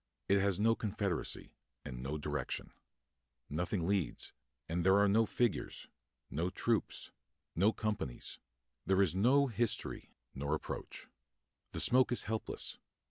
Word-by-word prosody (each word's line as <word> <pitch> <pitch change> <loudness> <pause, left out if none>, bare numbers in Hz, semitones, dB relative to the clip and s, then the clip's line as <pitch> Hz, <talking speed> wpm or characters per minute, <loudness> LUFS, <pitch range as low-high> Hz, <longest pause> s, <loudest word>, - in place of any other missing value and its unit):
It 100 0 +4
has 100 -1 +2
no 115 +2 +5
confederacy, 105 -4 -2 0.3
and 60 -1 -6
no 70 +4 -3
direction. 75 -3 -3 0.8
Nothing 85 +3 -1
leads, 95 -2 -1 0.3
and 85 +1 -1
there 95 +2 +6
are 100 0 +5
no 110 +3 +4
figures, 120 -4 -1 0.4
no 85 +4 0
troops, 115 +3 -1 0.4
no 100 +6 +4
companies; 105 - -3 0.4
there 95 +1 +4
is 90 - +1
no 125 +9 +4
history, 120 -3 -1 0.2
nor 70 +3 -1
approach. - - -6 0.7
The - - -4
smoke 130 +1 +4
is 120 - +1
helpless. 110 0 -2
100 Hz, 130 wpm, -34 LUFS, 85-110 Hz, 0.8 s, there